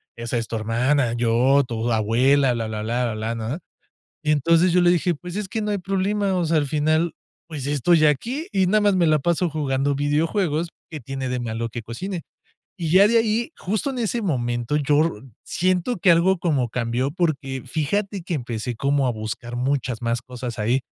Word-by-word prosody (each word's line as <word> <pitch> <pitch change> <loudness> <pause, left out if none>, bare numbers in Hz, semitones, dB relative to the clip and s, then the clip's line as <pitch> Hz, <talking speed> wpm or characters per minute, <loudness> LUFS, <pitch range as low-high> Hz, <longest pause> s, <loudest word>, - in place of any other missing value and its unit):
esa 120 +1 -3
es 115 - -2
tu 115 - -3
hermana, 120 +3 +1
yo, 120 +4 +3
tu 115 0 -2
abuela, 125 +5 +3
blá 115 -1 -2
blá 110 -1 -4
blá, 120 +1 -1
blá", 110 +2 -3
¿no? 115 +8 -4 0.7
Y 150 - +1
entonces 165 +5 +3
yo 180 - +4
le 175 - +5
dije: 175 0 +2
"Pues 175 +4 -8
es 210 -2 -3
que 220 +2 -3
no 210 - -1
hay 205 - 0
problema, 195 +1 0
o 175 - +1
sea, 165 0 +1
al 145 - 0
final, 155 +3 +1 0.4
pues 145 -5 -5
estoy 155 +3 +3
aquí 245 - -1
y 190 -2 +2
nada 210 +4 +3
más 205 -1 +3
me 175 -2 +3
la 155 0 +4
paso 170 +3 0
jugando 140 -2 0
videojuegos, 155 +3 0 0.2
¿qué 155 -3 -6
tiene 135 +1 -5
de 125 0 -2
malo 115 0 -3
que 120 +1 -6
cocine?". 170 - -5 0.6
Y 165 -3 -2
ya 195 +4 +6
de 230 - +3
ahí, 225 +3 0
justo 215 +8 -2
en 260 - -5
ese 235 0 -1
momento, 120 - -1
yo 145 0 +3
r 165 +1 +3 0.3
siento 185 +6 0
que 180 0 +3
algo 170 +2 +4
como 145 -9 0
cambió 120 +3 -1
porque 140 -6 -2
fíjate 190 - -2
que 175 0 -3
empecé 120 -3 -4
como 140 +2 +1
a - - +2
buscar 115 +2 -5
muchas 125 -2 -1
más 115 0 0
cosas 125 -2 -7
ahí. 115 +5 +1
145 Hz, 200 wpm, -23 LUFS, 120-180 Hz, 0.7 s, ya